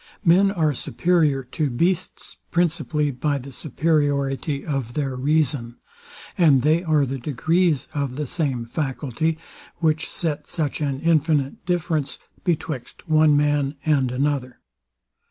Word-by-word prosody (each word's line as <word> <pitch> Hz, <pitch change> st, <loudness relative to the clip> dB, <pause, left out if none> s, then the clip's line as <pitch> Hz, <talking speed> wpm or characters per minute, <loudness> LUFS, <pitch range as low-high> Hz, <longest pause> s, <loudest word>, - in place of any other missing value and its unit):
Men 185 Hz, +4 st, +5 dB
are 160 Hz, -6 st, +1 dB
superior 155 Hz, -1 st, +1 dB
to 145 Hz, +4 st, -2 dB
beasts 170 Hz, +9 st, -1 dB
principally 160 Hz, -3 st, 0 dB
by 140 Hz, +2 st, -1 dB
the 135 Hz, +1 st, -8 dB
superiority 140 Hz, -2 st, 0 dB
of 135 Hz, -6 st, -3 dB
their 135 Hz, -3 st, -1 dB
reason; 135 Hz, -3 st, 0 dB, 0.6 s
and 150 Hz, -9 st, +4 dB
they 160 Hz, +4 st, +3 dB
are 155 Hz, -4 st, +2 dB
the 135 Hz, +1 st, -4 dB
degrees 155 Hz, +3 st, +1 dB
of 140 Hz, -4 st, -2 dB
the 150 Hz, +2 st, -2 dB
same 135 Hz, -5 st, -1 dB
faculty, 145 Hz, +4 st, -2 dB, 0.4 s
which 160 Hz, -2 st, 0 dB
set 150 Hz, -3 st, -3 dB
such 155 Hz, -3 st, -2 dB
an 140 Hz, -2 st, -1 dB
infinite 155 Hz, -2 st, +1 dB
difference 160 Hz, -5 st, -1 dB, 0.3 s
betwixt 155 Hz, -6 st, -3 dB
one 155 Hz, -2 st, +5 dB
man 145 Hz, -1 st, +1 dB
and 140 Hz, -5 st, +2 dB
another. 130 Hz, -1 st, -1 dB
150 Hz, 125 wpm, -23 LUFS, 135-160 Hz, 0.6 s, Men